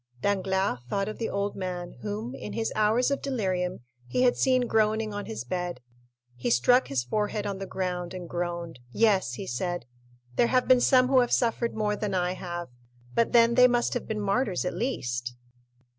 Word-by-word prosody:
Danglars 190 -3 0
thought 195 0 0
of 215 - -6
the 230 - -1
old 200 0 -2
man 180 -2 -4
whom, 215 +4 -4
in - - -7
his 225 -1 -2
hours 220 +5 +3
of 280 - -1
delirium, 185 - -1 0.3
he 130 - +1
had 245 - +4
seen 255 -1 +2
groaning 220 -1 +1
on 205 0 -5
his 110 +1 -5
bed. 175 +2 -3 0.6
He 120 0 -2
struck 245 - +4
his 135 -3 -1
forehead 210 - -1
on 200 -1 -3
the 195 - -5
ground 180 -1 -3
and 180 -2 -6
groaned. 170 -3 -4
"Yes," 195 - +2
he - - -5
said, 175 +6 -3 0.5
"there 235 - +4
have 255 0 +2
been 255 -1 +6
some 255 0 +5
who 265 0 +5
have 245 -1 +2
suffered 235 -1 +1
more 210 -1 0
than 205 -2 -2
I 180 -1 +1
have, 175 -3 -5 0.4
but 230 - +2
then 235 0 +5
they 250 +1 +7
must 240 -1 +1
have 245 - -3
been 215 -1 -2
martyrs 200 -2 0
at 180 - -1
least." 125 - -3
200 Hz, 190 wpm, -27 LUFS, 180-235 Hz, 0.6 s, they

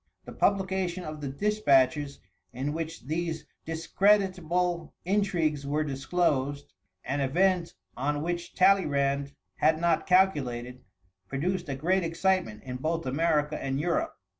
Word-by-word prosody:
The - - -9
publication 190 -2 0
of 155 -1 -7
the 145 - -3
dispatches 140 -5 +2 0.3
in 135 +4 -2
which 165 0 -5
these 160 +1 -3 0.2
discreditible 180 -1 +1
intrigues 175 -7 +1
were 150 +2 +1
disclosed, 140 - -1 0.3
an 140 +3 -1
event 175 +5 +1 0.2
on 145 +3 -1
which 175 0 -4
Talleyrand 140 -7 +2 0.2
had 155 0 +3
not 170 -1 +1
calculated, 130 -10 +1 0.4
produced 175 +4 -2
a 135 - -2
great 180 +8 +1
excitement 165 - 0
in 125 -1 -5
both 165 +4 -2
America 150 +2 +1
and 135 0 -1
Europe. 310 - -1
160 Hz, 120 wpm, -28 LUFS, 140-180 Hz, 0.4 s, had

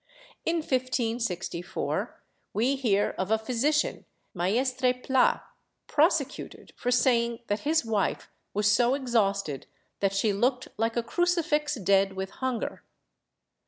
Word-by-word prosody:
In 330 0 +2
1564 230 - -2 0.3
we 245 +6 +2
hear 210 -7 +1
of 185 +1 -1
a 220 - +4
physician, 255 +7 0 0.3
Maestre 250 +8 +1
Pla, 255 0 +2 0.4
prosecuted 300 -2 0
for 245 - -3
saying 235 -2 +2
that 205 0 -1
his 315 -5 +2
wife 215 -4 -1 0.2
was 210 +1 -1
so 240 +4 +4
exhausted 200 - 0 0.3
that 195 -1 +1
she 205 +1 +2
looked 250 +5 0
like 225 +2 -1
a 235 - +1
crucifix 305 0 +1
dead 195 -2 +2
with 190 0 -4
hunger. 260 -3 -3
235 Hz, 120 wpm, -28 LUFS, 205-265 Hz, 0.4 s, a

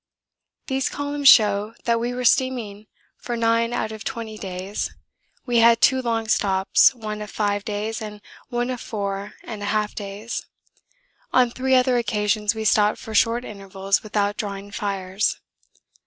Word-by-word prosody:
These 265 0 -1
columns 285 0 -1
show 210 0 +5
that 235 -1 +1
we 240 +1 -2
were 250 0 -3
steaming 225 -5 +1 0.3
for 240 -1 -4
nine 230 0 +2
out 220 -2 -2
of 220 0 -8
twenty 225 -2 -5
days. 190 0 -4 0.6
We 240 -2 +2
had 230 0 +6
two 260 +1 +4
long 230 -2 -1
stops, 195 +4 +3
one 215 -2 -5
of 210 - -6
five 205 -1 -1
days 215 +2 -3
and 210 -1 -7 0.3
one 245 0 -1
of 250 - -5
four 200 -1 -4
and 215 -3 -7
a 205 - -3
half 210 0 0
days. 205 +3 -6 0.9
On 250 -2 +4
three 260 +1 +1
other 250 -1 +3
occasions 210 -1 0
we 220 0 -4
stopped 210 0 +3
for 220 - -9
short 230 +3 +2
intervals 195 -1 -2
without 205 -1 -1
drawing 200 -1 -5
fires. 195 0 -2
215 Hz, 155 wpm, -23 LUFS, 205-235 Hz, 0.9 s, had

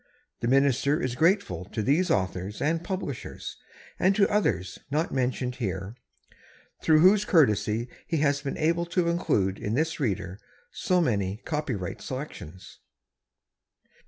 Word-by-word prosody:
The 115 - -2
Minister 140 +3 +3
is 130 -7 -2
grateful 155 - +1
to 105 +3 -4
these 165 - +2
authors 95 - -1
and 165 +3 0
publishers 185 - -5 0.4
and 190 +2 +3
to 200 -1 +4
others, 205 - 0
not 150 +4 0
mentioned 125 -1 -1
here, 95 -3 -3 0.9
through 155 -1 +5
whose 195 +4 +6
courtesy 115 - +2 0.2
he 165 - 0
has 145 -1 +2
been 140 -2 -4
able 170 +2 +1
to 170 0 +1
include 100 - 0
in 105 +2 -2
this 160 +4 0
Reader 95 -7 -2 0.3
so 180 -2 +1
many 100 - -1
copyright 145 - -3
selections. 130 - -8
135 Hz, 130 wpm, -27 LUFS, 105-165 Hz, 0.9 s, whose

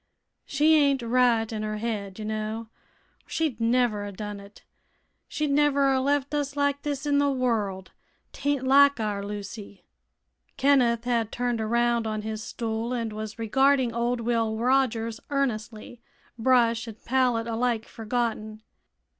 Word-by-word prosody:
She 300 +3 +3
ain't 280 -4 +3
right 235 -2 +2
in 215 - -3
her 215 0 -3
head, 210 -4 -4
ye 215 - -6
know, 215 +1 -3 0.6
or - - -32
she'd 295 -9 -2
never 230 -3 +2
a 205 - -5
done 205 +1 -6
it. 200 +1 -15 0.6
She'd 300 -2 -2
never 280 -1 +3
a 260 - +1
left 285 +1 0
us 290 -1 -2
like 285 0 0
this 290 -1 -3
in 285 -1 +2
th' 285 -2 +1
world. 210 -7 -1 0.4
'Taint 285 -2 -1
like 280 0 +5
our 205 -2 -2
Lucy." 205 -1 -8 0.7
Kenneth 250 -4 +3
had 235 -3 0
turned 245 -2 -1
around 235 +1 +1
on 215 -1 -3
his 220 0 -4
stool 230 +1 -3
and 230 -3 -3
was 215 +1 -6
regarding 260 +2 +2
old 235 +1 -1
Will 225 -2 0
Rogers 230 -2 +1
earnestly, 240 -4 -3 0.3
brush 235 -1 +2
and 225 -1 -8
pallet 250 -2 +1
alike 230 0 -1
forgotten. 220 -2 -3
235 Hz, 145 wpm, -26 LUFS, 220-265 Hz, 0.7 s, like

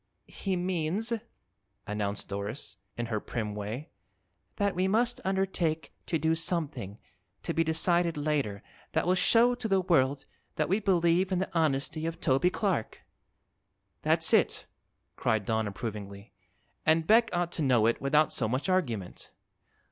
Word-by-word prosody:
"He 195 -2 -3
means," 180 +5 -1 0.7
announced 105 -1 -3
Doris, 100 +4 -4 0.2
in 120 - -2
her 110 -2 -2
prim 105 -1 -4
way, 105 +9 -5 0.6
"that 200 -2 0
we 185 +1 +1
must 235 +4 +1
undertake 190 -4 -1
to 165 - +1
do 160 +1 +1
something, 155 - -1 0.5
to 170 - -2
be 165 - +2
decided 165 +1 +1
later, 145 -9 -1 0.3
that - - +1
will 180 - +3
show 230 +6 +4
to 240 -2 -4
the 195 -2 +3
world 140 -7 +2 0.3
that 155 - 0
we 195 +4 +2
believe 180 -2 +2
in 185 - +1
the 190 +1 -2
honesty 155 0 0
of 165 - -5
Toby 135 +7 +3
Clark." 185 - -2 1.0
"That's - - +4
it!" - - +3 0.5
cried 110 -2 0
Don 110 0 0
approvingly; 100 -1 -7 0.5
"an' 160 +1 +4
Beck 225 +7 +4
ought 175 -1 -1
to - - -3
know 125 -6 +3
it 115 - +1
without 150 +3 +3
so 115 - 0
much 130 - -1
argument." 120 - -2
160 Hz, 150 wpm, -29 LUFS, 115-185 Hz, 1.0 s, show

